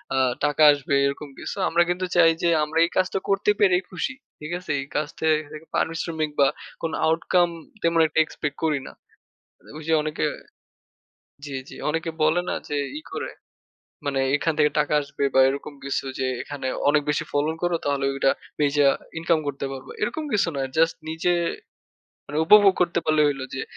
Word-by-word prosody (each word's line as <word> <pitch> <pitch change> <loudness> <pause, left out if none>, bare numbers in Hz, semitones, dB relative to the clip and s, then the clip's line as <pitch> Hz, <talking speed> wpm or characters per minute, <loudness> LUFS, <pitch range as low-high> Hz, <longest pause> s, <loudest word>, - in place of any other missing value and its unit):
আ - - +1 0.3
টাকা 145 +1 +2
আসবে 145 0 0
এরকম 140 +1 -3
কিছু। - - -5
আমরা 170 +1 +4
কিন্তু 180 +1 -1
চাই 165 -2 +6
যে 170 - +4
আমরা 155 +2 -3
এই - - -5
কাজটা 185 +1 +1
করতে 195 +1 +3
পেরেই 185 -2 +4
খুশি। 185 +8 -3 0.3
ঠিক 155 +3 -7
আছে? 170 -4 -6
এই 140 - -8
কাজ 150 - 0
থেকে 155 0 -1
পারিশ্রমিক 160 -2 -1
বা 140 - +6 0.3
কোন 165 -1 -2 0.2
outcome 170 +2 +2 0.3
তেমন 165 0 +3
একটা 155 +1 0
এক্সপেক্ট 145 -2 -5
করি 150 -3 +1
না। - - -10 0.8
ঐ - - -7
যে 160 - +2
অনেকে 155 0 -2 1.2
জ্বি, 140 -2 -5
জ্বি। - - -10
অনেকে 165 +2 -1
বলে 160 +3 +3
না - - -1
যে 145 - -1 0.2
ই - - -14
করে - - -4 0.7
মানে 140 -1 0 0.2
এখান 160 +3 0
থেকে 150 0 +4
টাকা 150 0 +1
আসবে 140 0 -5
বা - - +6
এরকম 140 +2 -5
কিছু 140 0 -2
যে, 130 - 0 0.2
"এখানে 145 -2 -5 0.2
অনেক 150 0 +4
বেশি 150 +1 +1
ফলন 150 +3 +1
করো 175 -1 +1
তাহলে 140 -1 0
ঐডা 135 0 +2 0.3
বেইচা 145 -1 +3 0.3
ইনকাম 165 -1 +2
করতে 140 -1 -3
পারবা।" 130 0 -9
এরকম 275 +9 -1
কিছু 195 -4 +2
না, 135 - -1 0.2
জাস্ট 165 +1 +3
নিজে 165 +2 0 0.9
মানে 150 +2 -3
উপভোগ 205 0 +7
করতে 170 -1 0
পারলেই 155 -1 +3
হইলো 135 -2 -3
যে 135 - -3
155 Hz, 180 wpm, -24 LUFS, 145-170 Hz, 1.2 s, উপভোগ